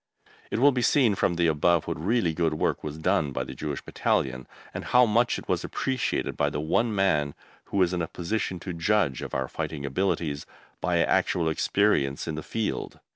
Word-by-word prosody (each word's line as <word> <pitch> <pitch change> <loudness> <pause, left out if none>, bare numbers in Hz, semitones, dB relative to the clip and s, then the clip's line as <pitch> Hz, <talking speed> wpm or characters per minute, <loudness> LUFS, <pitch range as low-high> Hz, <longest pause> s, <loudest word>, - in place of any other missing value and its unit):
It - - -2
will 140 +4 +6
be 125 -2 -1
seen 120 -3 +4
from 90 -2 +1
the 85 0 +2
above 80 +1 +3
what 80 - -4
really 100 -4 +1
good 80 -1 0
work - - -1
was 75 0 -5
done 75 -2 +1
by - - -2
the - - -8
Jewish 75 -3 -5
Battalion, 65 -1 -1 0.3
and - - -5
how 125 0 +5
much 120 +2 +2
it - - -9
was - - 0
appreciated 130 -2 -1
by 75 - +1
the 75 - -3
one 105 +9 +1
man 75 -8 +1 0.3
who - - -4
was 90 -2 +3
in 90 - -1
a 80 - -2
position 90 +1 -3
to 90 - -5
judge 85 -4 +1
of - - -5
our 65 -1 -1
fighting 70 +1 -4
abilities 75 -1 -1 0.3
by - - +1
actual 85 -2 +1
experience 80 -4 +1
in 80 - -2
the 80 - -4
field. 110 +6 -3
85 Hz, 200 wpm, -26 LUFS, 75-105 Hz, 0.3 s, will